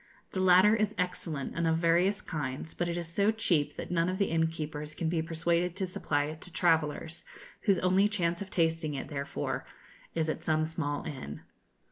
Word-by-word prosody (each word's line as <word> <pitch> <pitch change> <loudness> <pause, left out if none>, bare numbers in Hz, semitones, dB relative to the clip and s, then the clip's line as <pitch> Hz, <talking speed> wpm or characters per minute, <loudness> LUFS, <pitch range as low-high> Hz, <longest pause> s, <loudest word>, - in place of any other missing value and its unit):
The 190 - -3
latter 185 +3 +6
is 215 -1 0
excellent 165 -6 -2
and 165 0 +1
of 160 0 +3
various 175 +5 +2
kinds, 150 -1 -4
but 175 - -1
it 170 - -2
is 170 -1 -3
so 200 +5 +2
cheap 180 -9 +1
that - - -6
none 170 0 +2
of 185 - -2
the 200 -3 +1
innkeepers 155 -2 -2
can 165 - -1
be 165 -1 +1
persuaded 170 +2 0
to 190 - -1
supply 145 -5 0
it 155 +2 -6
to 180 - -11
travellers, 160 -1 +1 0.4
whose 200 -4 +4
only 185 +3 +3
chance 170 -4 0
of 200 - -5
tasting 160 -4 0
it, 135 - -5
therefore, 140 -2 -3 0.5
is 160 -1 +1
at 155 - -2
some 155 0 +1
small 155 -3 -2
inn. 75 - -6
165 Hz, 190 wpm, -30 LUFS, 155-180 Hz, 0.5 s, latter